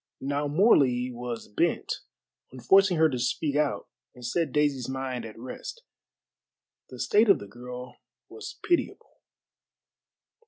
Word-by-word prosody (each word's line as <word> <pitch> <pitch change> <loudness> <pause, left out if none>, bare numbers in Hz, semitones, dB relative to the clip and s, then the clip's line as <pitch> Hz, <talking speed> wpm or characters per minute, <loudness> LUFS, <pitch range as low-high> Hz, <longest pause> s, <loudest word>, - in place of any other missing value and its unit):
Now 140 +2 -1
Morley 140 - +4
was 120 -1 -6
bent 105 - 0 0.5
on 130 - -10
forcing 190 +8 +5
her 160 0 +6
to 130 -5 -3
speak 140 +4 -1
out 150 -1 0 0.3
and 125 -1 -10
set 160 +3 0
Daisy's 140 -4 +1
mind 130 -3 -3
at 110 -1 -10
rest. 130 - -8 1.1
The - - -10
state 215 +1 +3
of 200 - +7
the - - -9
girl 125 +4 -9 0.3
was 435 -1 -9
pitiable. 345 -1 -1
135 Hz, 130 wpm, -27 LUFS, 125-160 Hz, 1.1 s, of